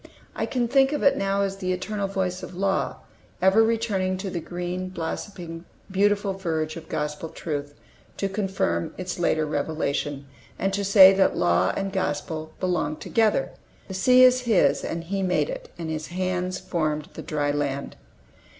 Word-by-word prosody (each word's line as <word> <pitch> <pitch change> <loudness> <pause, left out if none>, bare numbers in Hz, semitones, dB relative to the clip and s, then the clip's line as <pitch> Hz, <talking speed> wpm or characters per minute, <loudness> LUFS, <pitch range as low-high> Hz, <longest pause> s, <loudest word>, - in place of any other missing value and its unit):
I - - -1
can 245 -2 0
think 270 +3 +4
of 295 - -1
it 280 - +5
now 195 0 0
as 195 0 -2
the 185 -2 -2
eternal 200 +2 -2
voice 185 -2 -2
of 180 - -8
Law, 195 +1 0 0.4
ever 190 +4 +5
returning 215 -5 +1
to 190 0 -4
the 175 - -2
green, 180 +2 -4
blossoming, 170 -1 -5 0.3
beautiful 200 0 +2
verge 160 -4 -2
of 165 - -10
Gospel 150 +2 -3
truth, 145 -3 -5 0.4
to 195 - 0
confirm 190 - -1
its 180 -1 -4
later 155 -2 +2
revelation, 145 -1 -2 0.3
and 195 0 -1
to 200 +1 0
say 195 -1 +8
that 190 0 +2
Law 90 +1 +3
and 195 0 -2
Gospel 155 -3 -2
belong 175 -5 0
together. 220 +5 +1 0.4
"The - - -5
sea 250 +7 +5
is 255 0 +7
His, 210 -5 +3
and 165 0 -3
He 195 +3 -2
made 185 - +1
it: - - -7
and 165 -2 -4
His 155 -1 -4
hands 185 0 -2
formed 155 -5 -2
the - - -7
dry 145 -2 -1
land." 140 -1 -2
185 Hz, 170 wpm, -25 LUFS, 155-195 Hz, 0.4 s, say